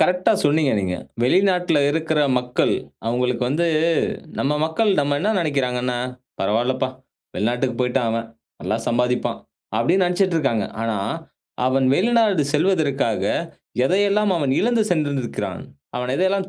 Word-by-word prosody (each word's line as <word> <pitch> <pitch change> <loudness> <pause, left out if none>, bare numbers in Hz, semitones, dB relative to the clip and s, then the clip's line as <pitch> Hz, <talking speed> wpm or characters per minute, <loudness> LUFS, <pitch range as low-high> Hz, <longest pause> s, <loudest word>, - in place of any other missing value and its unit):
கரெக்டா 180 0 +3
சொன்னீங்க 145 -1 +3
நீங்க. 90 -1 -2 0.3
வெளிநாட்டுல 180 +2 +3
இருக்குற 160 0 0 0.2
மக்கள் 125 0 0 0.3
அவுங்களுக்கு 125 +1 0
வந்து, 165 +5 +1 0.7
நம்ம 140 +2 +1
மக்கள் 185 +7 +1
நம்ம 145 0 0
என்ன 210 +4 +1
நெனைக்குறாங்கன்னா, 125 -6 -1 0.4
"பரவால்லப்பா 120 +6 0 0.5
வெளிநாட்டுக்கு 120 +3 0
போயிட்டான் 125 -1 +1
அவன். 115 0 -3 0.3
நல்லா 110 - -1
சம்பாதிப்பான்." 125 +1 0 0.4
அப்படின்னு 185 +2 +3
நெனைச்சுட்டு 180 0 +1
இருக்காங்க. 115 -8 0 0.2
ஆனா 115 -2 -1 0.7
அவன் 130 0 +2
வெளிநாடு 215 -4 +3
செல்வதற்காக, 150 - +1 0.6
எதையெல்லாம் 200 +4 +2
அவன் 140 -5 0
இழந்து 235 0 +2
சென்றிருந்திக்கிறான். 145 -7 -2 0.3
அவன் 125 +1 -2
எதையெல்லாம் 190 +1 +1
145 Hz, 115 wpm, -21 LUFS, 125-180 Hz, 0.7 s, கரெக்டா